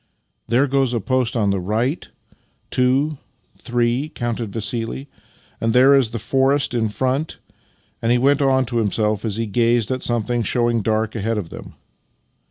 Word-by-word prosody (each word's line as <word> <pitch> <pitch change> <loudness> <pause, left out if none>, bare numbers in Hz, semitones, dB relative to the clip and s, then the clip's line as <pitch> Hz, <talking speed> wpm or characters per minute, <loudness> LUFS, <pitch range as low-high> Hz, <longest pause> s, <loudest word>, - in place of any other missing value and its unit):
" - - -50
There 125 +5 +3
goes 135 -3 +1
a - - +1
post 125 +2 0
on 105 -3 +2
the 100 - 0
right 110 - -2 0.3
— - - -42
two 135 +4 +1 0.2
— - - -43
three," 120 +4 0
counted 120 -5 -4
Vassili. 115 +5 -3 0.3
" - - -33
And 115 0 +1
there 130 +3 +6
is 135 -5 +4
the 115 - -4
forest 135 +4 +1
in 115 -2 0
front," 130 +7 -2 0.7
he 120 +2 +3
went 140 +3 +3
on 130 -1 +3
to 120 0 -3
himself 105 -1 0
as 110 -3 -2
he 115 +1 -1
gazed 115 +2 +1
at 130 0 -2
something 120 0 -1
show 120 +1 +1
ing 115 -1 0
dark 110 +1 0
ahead 110 +1 -1
of 95 -6 -4
them. - - -10
120 Hz, 180 wpm, -21 LUFS, 110-130 Hz, 0.7 s, there